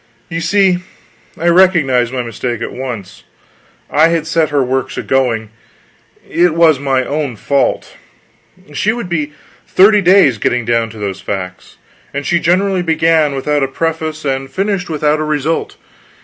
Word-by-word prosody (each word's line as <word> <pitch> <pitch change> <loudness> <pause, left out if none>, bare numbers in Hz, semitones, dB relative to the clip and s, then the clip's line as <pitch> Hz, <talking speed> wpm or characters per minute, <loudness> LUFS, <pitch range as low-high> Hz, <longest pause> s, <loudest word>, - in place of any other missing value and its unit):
You 165 -1 -3
see, 190 +1 +2 0.6
I 170 - -2
recognized 165 -9 +3
my 130 -1 -2
mistake 120 0 -4
at - - -4
once. 105 -8 -7 0.6
I 155 +3 +4
had 165 -1 0
set 165 -2 +1
her 145 -2 +1
works 130 0 -2
a - - -3
going; 115 -5 0 0.8
it 175 -1 +2
was 160 -4 +4
my 135 -2 0
own 145 -3 -3
fault; 140 +6 -1 0.8
she 210 +8 0
would 235 -6 -5
be 150 -3 -2 0.3
thirty 205 +2 +5
days 180 - +4
getting 120 +2 0
down 115 -1 +1
to 110 - -12
those 100 -2 -4
facts. 90 -2 -6 0.4
And 140 0 -3
she 170 - +2
generally 185 +3 +1
began 160 -3 +2
without 145 +2 0
a 135 - +1
preface 155 +1 -3
and 135 -1 -2
finished 195 +4 -2
without 150 -1 0
a - - -1
result. 155 - -2
150 Hz, 155 wpm, -15 LUFS, 130-170 Hz, 0.8 s, thirty